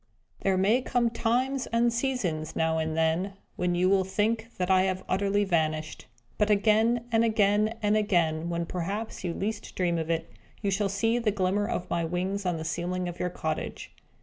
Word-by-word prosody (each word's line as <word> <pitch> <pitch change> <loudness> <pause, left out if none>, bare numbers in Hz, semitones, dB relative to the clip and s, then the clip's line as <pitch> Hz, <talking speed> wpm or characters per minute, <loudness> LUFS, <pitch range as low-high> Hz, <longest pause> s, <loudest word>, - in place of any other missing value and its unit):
There 190 -1 +1
may 210 +7 +3
come 240 -2 +1
times 255 +4 0
and 235 0 +2
seasons, 190 - -2
now 160 0 +1
and 160 0 -2
then, 165 +5 +1 0.2
when 180 0 0
you 180 +1 +2
will 190 0 +4
think 220 +4 -1
that 180 +1 0
I 185 0 +5
have 185 0 -2
utterly 200 +2 +1
vanished. 155 -4 -1 0.3
But 210 0 +3
again, 220 +3 +3
and 225 0 +4
again, 215 0 +2
and 210 +1 +3
again, 170 -6 +1
when 170 0 -1
perhaps 195 +7 -4
you 175 - -1
least 210 +6 -4
dream 175 -2 +1
of 160 0 -4
it, 165 -1 -1 0.4
you 200 - +1
shall 200 +1 +1
see 225 +4 +1
the 230 -3 +1
glimmer 200 +1 0
of 180 - -3
my 170 -1 +1
wings 185 +4 -2
on 175 -2 0
the 160 - -5
ceiling 180 +2 -2
of 175 0 -6
your 180 - 0
cottage. 160 -3 -4
190 Hz, 190 wpm, -28 LUFS, 170-215 Hz, 0.4 s, I